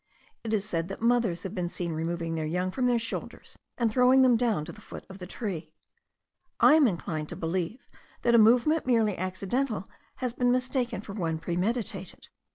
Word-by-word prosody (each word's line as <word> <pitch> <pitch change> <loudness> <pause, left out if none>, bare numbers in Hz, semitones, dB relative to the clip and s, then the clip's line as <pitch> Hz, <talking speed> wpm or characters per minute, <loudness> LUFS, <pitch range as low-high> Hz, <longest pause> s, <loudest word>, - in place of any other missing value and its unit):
It 225 - -4
is 210 -2 0
said 165 -4 -2
that 195 +3 -7
mothers 230 -8 +2
have 190 - -5
been 180 -4 -2
seen 170 -1 -3
removing 165 +1 -2
their 160 -1 -2
young 180 +3 -1
from 250 +4 0
their 245 -1 +3
shoulders, 230 0 -6 0.2
and 235 -3 +1
throwing 255 +3 +5
them 250 -2 +5
down 225 -9 +1
to - - -7
the 210 - -14
foot - - -10
of 190 - -11
the 180 - -7
tree. 175 -7 -5 0.8
I - - +7
am 310 -4 +6
inclined 160 -5 -3
to - - -6
believe 175 +7 -3 0.4
that 235 - +3
a 235 - +7
movement 250 +8 +4
merely 225 -5 +3
accidental 195 +5 -2 0.3
has 250 -2 -3
been 245 0 +2
mistaken 255 -3 0
for 205 - -9
one 165 -6 -2
premeditated. 190 +3 -3
210 Hz, 190 wpm, -28 LUFS, 175-245 Hz, 0.8 s, I